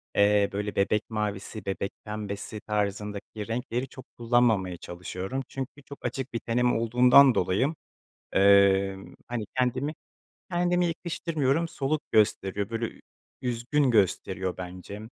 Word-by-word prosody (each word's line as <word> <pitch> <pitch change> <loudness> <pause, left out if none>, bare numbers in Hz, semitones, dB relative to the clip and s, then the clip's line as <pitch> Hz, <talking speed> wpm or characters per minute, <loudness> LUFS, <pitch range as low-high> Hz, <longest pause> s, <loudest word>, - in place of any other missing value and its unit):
eee, 100 0 +4
böyle, 105 +1 -3
bebek 105 +2 +2
mavisi, 105 -1 -3
bebek 100 0 -2
pembesi 105 0 -5
tarzındaki 105 0 -3
renkleri 125 +2 -2
çok 130 0 -12
kullanmamaya 115 -6 +2
çalışıyorum. 90 +8 -5
Çünkü 135 +1 -7
çok 140 - -11
açık 135 0 -3
bir 115 - -1
tenim 120 +2 +1
olduğundan 125 +2 +6
dolayı, 100 - +1 0.6
eee, 100 0 +5 0.3
hani, 120 -3 -2
kendimi 130 +4 0 0.6
kendime 175 0 +2
yakıştırmıyorum, 165 -2 -1
soluk 150 0 -1
gösteriyor, 100 -1 +2
böyle, 115 0 -2
ü - - -8 0.4
üzgün 125 +3 +1
gösteriyor 95 -3 +1
bence. 90 +3 -7
110 Hz, 120 wpm, -27 LUFS, 100-130 Hz, 0.6 s, olduğundan